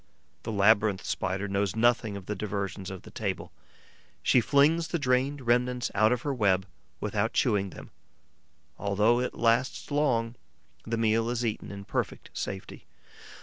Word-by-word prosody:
The - - -5
Labyrinth 105 -1 +3
Spider 95 +1 -2
knows 100 0 -1
nothing 110 -2 +2
of 95 - -10
the 105 - -3
diversions 100 -1 -4
of 95 -1 -8
the - - -12
table; - - -4 0.7
she 125 - +5
flings 150 +7 +3
the 170 - -1
drained 135 0 +1
remnants 125 +1 +1
out 110 +3 +4
of 125 -1 0
her 145 - -1
web, 95 -6 +2 0.3
without - - -1
chewing 100 -2 +2
them. - - -11 0.9
Although 105 +4 +2
it 125 - -2
lasts 120 +5 +1
long, 125 -6 +1 0.5
the 115 0 -1
meal 115 +1 +2
is 120 0 -1
eaten 110 -2 -3
in 100 0 -8
perfect - - -3
safety. 95 0 -6
110 Hz, 150 wpm, -28 LUFS, 100-125 Hz, 0.9 s, she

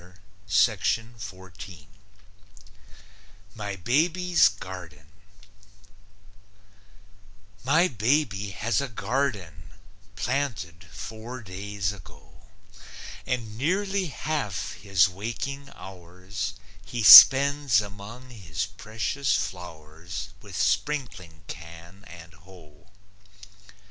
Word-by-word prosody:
MY 105 -2 -5
BABY'S 165 - +3
GARDEN 90 -7 -10 2.6
My 160 +8 +3
baby 110 - 0
has 105 +5 -1
a 140 - -3
garden, 105 - -3 0.5
"Planted" 100 -11 -3
four 115 +2 -8
days 100 +1 -4
ago, 80 -7 -17 0.8
And 120 -4 -3
nearly 190 +5 0
half 140 - -3
his 100 -3 +2
waking 120 +9 -6
hours 95 +2 -7 0.3
He 115 +3 -4
spends 140 -1 +9
among 105 +5 -9
his 90 -7 -4
precious 110 +6 -2
flowers 85 +2 -6
With 100 -4 -9
sprinkling 95 - -2
can 85 +2 -11
and 85 -2 -13
hoe. 80 -2 -18
105 Hz, 75 wpm, -26 LUFS, 90-130 Hz, 2.6 s, spends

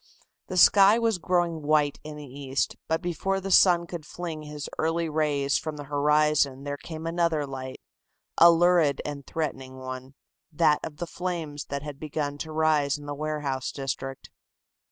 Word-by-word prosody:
The 185 - -4
sky 200 +4 +7
was 225 -5 +1
growing 175 -2 0
white 150 -1 +2
in 155 0 -8
the 150 - -8
east, 135 0 -3
but 160 0 -1
before 180 +3 -1
the 195 0 -5
sun 175 -2 +6
could 170 -2 -7
fling 165 0 -6
his 150 -1 -7
early 165 +1 0
rays 150 -3 +1
from 155 -1 -5
the 145 - -6
horizon 145 -1 +2
there 145 0 -3
came 160 -1 -7
another 165 -3 0
light, 130 -1 -7 0.6
a 170 - +9
lurid 170 -4 +3
and 145 -2 -6
threatening 135 -5 -4
one, 130 +1 -8 0.4
that 150 -1 +3
of 150 - -6
the 175 - -3
flames 165 -4 -4
that 140 0 -5
had 145 -2 -7
begun 145 -1 -3
to 160 - -5
rise 155 -2 +2
in 145 - -11
the 145 - -4
warehouse 145 -3 -3
district. 135 -1 -5
150 Hz, 170 wpm, -26 LUFS, 140-165 Hz, 0.6 s, a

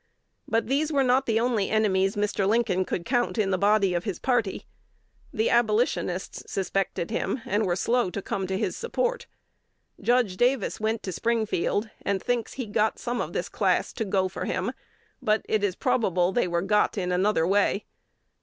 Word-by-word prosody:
But 225 0 +1
these 285 +6 0
were 280 -2 +3
not 260 +1 +2
the 225 -1 +2
only 230 -4 +1
enemies 195 -3 +2
Mr. 205 -1 0
Lincoln 205 -4 +2
could 170 - -3
count 245 -1 0
in 200 -3 +1
the - - +3
body 200 -2 +3
of 175 0 -1
his 200 -4 -3
party. 240 -7 0 0.7
The 220 +1 0
Abolitionists 215 -5 0
suspected 195 -1 -2
him, 230 +1 -2
and 205 +1 0
were 175 - +1
slow 240 +2 +1
to 190 - -4
come 195 -1 -3
to 190 0 -1
his 215 - -1
support. - - -2 0.7
Judge 240 -6 +2
Davis 245 -1 +1
went 220 0 -1
to 190 - -3
Springfield, 220 0 0
and 200 -1 0
thinks 240 +2 -2
he 260 - -4
"got 215 +1 0
some" 240 -1 -2
of - - -5
this - - -2
class - - 0
"to 225 - -2
go 190 -2 +1
for" 185 - -5
him; 190 +7 -2 0.5
but 215 0 +1
it 215 -2 +1
is 195 -3 +1
probable 185 -6 +1
they 240 -3 +1
were 170 0 0
"got" 210 +2 +2
in 180 -2 -1
another 180 -2 +2
way. 200 +2 +2
210 Hz, 180 wpm, -26 LUFS, 190-235 Hz, 0.7 s, were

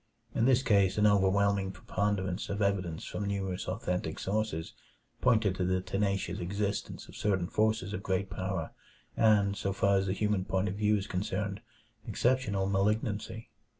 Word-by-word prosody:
In 115 - +2
this 130 0 +4
case 100 -6 +3
an 105 - +4
overwhelming 100 -1 +3
preponderance 95 0 -2
of 100 - -2
evidence 95 -5 -1
from 105 - -4
numerous 95 -2 -2
authentic 90 -5 -2
sources 100 -5 -2 0.5
pointed 110 -6 +3
to 95 - -2
the 95 +1 +1
tenacious 100 +1 -1
existence 100 +3 -3
of - - -13
certain 95 -4 0
forces 110 0 0
of 90 - -3
great 95 0 -1
power 95 -3 -3 0.4
and, 105 -3 +4
so 100 - -2
far 100 +1 +3
as 95 0 0
the 95 - +1
human 105 -1 0
point 95 +1 0
of 95 - -2
view 105 +1 +2
is 100 - -3
concerned, 100 +2 -3 0.5
exceptional 110 -3 +1
malignancy. 105 +3 -1
100 Hz, 155 wpm, -31 LUFS, 95-105 Hz, 0.5 s, this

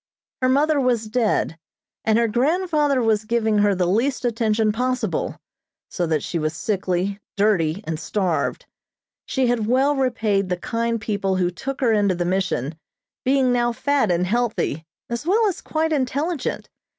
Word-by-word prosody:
Her 255 - +3
mother 290 +2 +3
was 245 -3 +1
dead, 215 -7 0 0.4
and 220 0 +3
her 235 0 +3
grandfather 295 - +1
was 220 -1 +2
giving 220 -1 +1
her 205 -1 +3
the 180 -1 +1
least 240 +9 0
attention 220 -2 +1
possible, 255 +3 -2 0.5
so 175 -2 -1
that 155 -3 0
she 170 - -2
was 155 0 -2
sickly, 190 +2 -1 0.2
dirty 200 -3 +2
and 160 -1 -3
starved. 185 -3 -1 0.6
She 265 -1 +1
had 240 -3 +1
well 270 +4 +3
repaid 220 -7 0
the 180 - 0
kind 230 +4 -1
people 200 -3 -1
who 180 -1 +1
took 270 +9 -5
her 235 -4 +3
into 200 -3 +2
the 175 0 -2
Mission, 175 -5 -1 0.4
being 260 -1 +3
now 240 -1 +1
fat 280 -2 +1
and 175 0 +2
healthy, 215 -7 -1 0.2
as 235 +6 -4
well 435 +5 +3
as 380 - -3
quite 320 0 -1
intelligent. 285 +2 -1
225 Hz, 160 wpm, -22 LUFS, 190-255 Hz, 0.6 s, Her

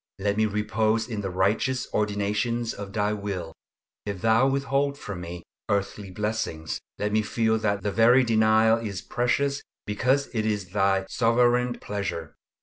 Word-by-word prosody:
Let 100 +1 0
me 110 0 +2
repose 110 +2 0
in 110 -4 -4
the 95 - -3
righteous 105 +8 +1
ordinations 105 +3 0
of 100 -1 -7
Thy 105 +1 0
will. 100 -5 -4 0.5
If 100 -2 -4
Thou 115 +3 +4
withhold 140 +1 0
from 100 -9 -6
me 85 0 -7 0.3
earthly 100 0 -1
blessings, 100 -5 -3 0.2
let 105 0 -1
me 110 +1 +3
feel 110 +1 +1
that 100 -2 -1
the 105 - 0
very 115 +5 +5
denial 110 -1 +4
is 105 -3 -5
precious 140 +6 0 0.2
because 130 +8 0
it 110 -2 0
is 105 -4 -1
Thy 95 -1 +2
sovereign 120 +2 +2
pleasure. 100 -5 -4
105 Hz, 150 wpm, -26 LUFS, 100-115 Hz, 0.5 s, very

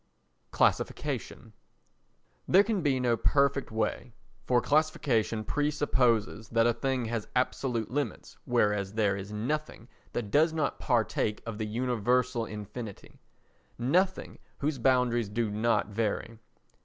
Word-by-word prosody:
Classification - - -1 0.9
There 195 - +6
can 210 -2 -1
be 140 -4 +1
no 120 -2 +2
perfect 140 +3 +2
way, 110 +2 -2 0.3
for 125 -1 +4
classification 125 -6 +1
presupposes 125 -7 +1
that 115 0 +3
a 120 - +4
thing 130 +1 -1
has 115 -1 -3
absolute 125 -2 -1
limits 140 -3 -3
whereas 105 -5 +1
there 105 -3 +2
is 100 +1 -7
nothing 120 +2 -3 0.3
that 110 -4 -3
does 160 +5 +4
not 155 -3 -1
partake 110 -4 0
of 115 -2 -6
the 110 - -2
universal 125 +1 0
infinity—nothing 120 - -4 0.2
whose 145 -2 -2
boundaries 120 -3 +2
do 110 0 -1
not 110 0 +1
vary. 110 +1 -2
120 Hz, 120 wpm, -29 LUFS, 110-135 Hz, 0.9 s, There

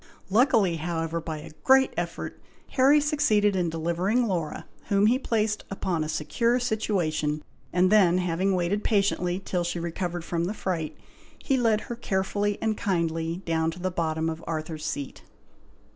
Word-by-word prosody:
Luckily, 220 -6 +4
however, 165 0 -2
by 160 -1 -4
a 150 - -10
great 265 0 +5
effort, - - -4 0.3
Harry 275 +3 +5
succeeded 285 -9 +2
in 180 -2 +1
delivering 170 +9 0
Laura, 170 -7 -2 0.2
whom 200 0 +3
he 245 +4 +4
placed 215 -4 0
upon 185 -4 -1
a 155 - -4
secure 230 +11 +1
situation, 170 -10 -1 0.3
and 180 +2 +3
then, 185 -5 +5
having 185 +2 +1
waited 185 +4 0
patiently 190 -3 +1
till 180 -2 -2
she 175 0 -2
recovered 170 0 -3
from 170 0 -1
the 200 +5 -3
fright, 170 -7 -3 0.4
he 270 - 0
led 225 -4 +2
her 240 - -6
carefully 205 -1 -1
and 220 -1 0
kindly 165 -1 -1
down 160 -1 +1
to 165 +2 -7
the 185 +1 -1
bottom 160 -2 -1
of 160 0 -4
Arthur's 155 -1 -4
Seat. 140 -1 -5
180 Hz, 160 wpm, -26 LUFS, 165-210 Hz, 0.4 s, great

